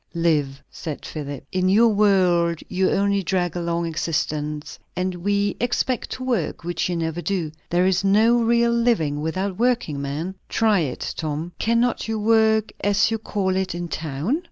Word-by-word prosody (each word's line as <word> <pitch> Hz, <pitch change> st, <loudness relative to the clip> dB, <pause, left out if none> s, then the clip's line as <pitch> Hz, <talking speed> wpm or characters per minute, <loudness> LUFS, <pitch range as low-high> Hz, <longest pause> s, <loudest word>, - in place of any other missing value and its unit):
"Live," 150 Hz, -5 st, 0 dB
said 155 Hz, -3 st, -6 dB
Philip. 145 Hz, -3 st, -6 dB
"In 185 Hz, 0 st, +1 dB
your 225 Hz, +4 st, +5 dB
world 180 Hz, -5 st, +3 dB
you 185 Hz, 0 st, +1 dB
only 200 Hz, 0 st, +2 dB
drag 180 Hz, -2 st, -1 dB
along 170 Hz, -1 st, -1 dB
existence. 150 Hz, -2 st, -3 dB, 0.2 s
And 180 Hz, +1 st, -1 dB
we 200 Hz, +3 st, 0 dB
expect 245 Hz, +1 st, 0 dB
to 255 Hz, -, -6 dB
work, 240 Hz, -13 st, -1 dB
which 175 Hz, +1 st, -2 dB
you 175 Hz, -, -1 dB
never 165 Hz, 0 st, -2 dB
do. 175 Hz, -5 st, -2 dB, 0.2 s
There 175 Hz, +1 st, +2 dB
is 190 Hz, +1 st, +2 dB
no 215 Hz, +4 st, +4 dB
real 235 Hz, +1 st, +3 dB
living 225 Hz, -12 st, +1 dB
without 185 Hz, +5 st, -2 dB
working, 235 Hz, -, +1 dB
man. 150 Hz, +7 st, -3 dB, 0.2 s
Try 220 Hz, -3 st, +3 dB
it, 145 Hz, -7 st, -3 dB
Tom." 155 Hz, +2 st, -3 dB
"Cannot 235 Hz, +1 st, +1 dB
you 220 Hz, 0 st, -1 dB
work, 220 Hz, 0 st, +3 dB
as 205 Hz, +2 st, +3 dB
you 225 Hz, -, -1 dB
call 195 Hz, -3 st, -1 dB
it, 190 Hz, -1 st, -1 dB
in 175 Hz, 0 st, -4 dB
town?" 160 Hz, -, -2 dB
185 Hz, 165 wpm, -23 LUFS, 165-215 Hz, 0.2 s, your